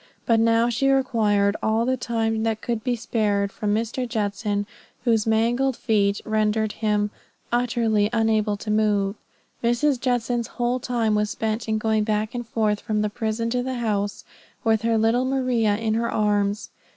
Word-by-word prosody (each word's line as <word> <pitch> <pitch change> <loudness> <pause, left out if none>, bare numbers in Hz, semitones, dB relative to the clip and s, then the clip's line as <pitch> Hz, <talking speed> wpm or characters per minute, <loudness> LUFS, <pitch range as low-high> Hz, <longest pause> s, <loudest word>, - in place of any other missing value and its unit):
But 230 -1 +3
now 230 +1 +3
she 245 +3 +1
required 215 -7 +2
all 220 +1 +1
the 260 +1 +1
time 225 -3 -1
that 220 -1 0
could 230 -2 -2
be 250 -1 0
spared 205 -3 0
from 210 0 -2
Mr. 235 +3 -2
Judson, 205 -2 -1 0.4
whose 225 -3 +2
mangled 235 +4 +1
feet 205 -4 +1
rendered 215 0 +1
him 210 -1 0 0.4
utterly 230 -3 +1
unable 220 -2 +1
to 210 +1 -4
move. 205 -2 +2 0.5
Mrs. 240 +3 +2
Judson's 245 -2 0
whole 245 +1 0
time 235 -3 0
was 210 0 +1
spent 220 +1 -2
in 220 - +1
going 220 0 +1
back 215 0 -1
and 240 -2 -5
forth 215 -2 0
from 215 -1 -1
the 210 - -1
prison 225 +1 -2
to 250 0 0
the 260 +1 -3
house 205 -4 -2 0.4
with 220 -2 +2
her 230 0 +1
little 225 +3 +2
Maria 250 -5 +1
in 220 0 -1
her 230 +1 0
arms. 205 0 0
225 Hz, 165 wpm, -24 LUFS, 210-235 Hz, 0.5 s, But